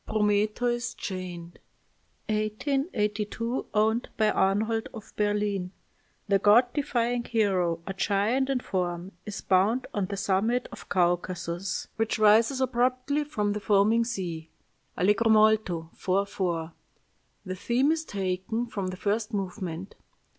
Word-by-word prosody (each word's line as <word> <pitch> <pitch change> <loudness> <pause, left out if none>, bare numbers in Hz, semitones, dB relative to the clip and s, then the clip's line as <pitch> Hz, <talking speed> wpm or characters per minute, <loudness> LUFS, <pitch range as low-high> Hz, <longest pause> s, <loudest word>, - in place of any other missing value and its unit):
PROMETHEUS 215 +3 0
CHAINED 175 -3 -6 0.7
(1882; 215 - -1
owned 220 +3 +1
by 215 -1 +3
Arnhold 215 +4 +1
of 220 - -11
Berlin) 205 -3 0 0.6
"The 200 -1 +3
god 230 +5 +5
defying 245 -4 0
hero, 185 -8 0
a 195 - -4
giant 210 +7 +1
in 265 -2 0
form, 180 -2 -3 0.2
is 205 - -5
bound 200 +7 +2
on 200 -3 -1
the 200 0 -4
summit 205 +5 +1
of - - -11
Caucasus, 175 0 -1
which 225 +1 0
rises 220 +5 +5
abruptly 255 +3 +1
from 210 -8 -1
the 210 - -3
foaming 210 +3 +3
sea. 175 -9 -4 0.5
Allegro 210 +5 +3
molto, 215 -7 +3
4 195 +2 0
4. 170 -5 -3 0.7
The 185 -1 -4
theme 245 +9 +2
is 320 0 0
taken 195 - -2
from 200 -5 -4
the 185 0 -5
first 215 +2 -1
movement.... 185 -2 -4
210 Hz, 125 wpm, -27 LUFS, 190-230 Hz, 0.7 s, god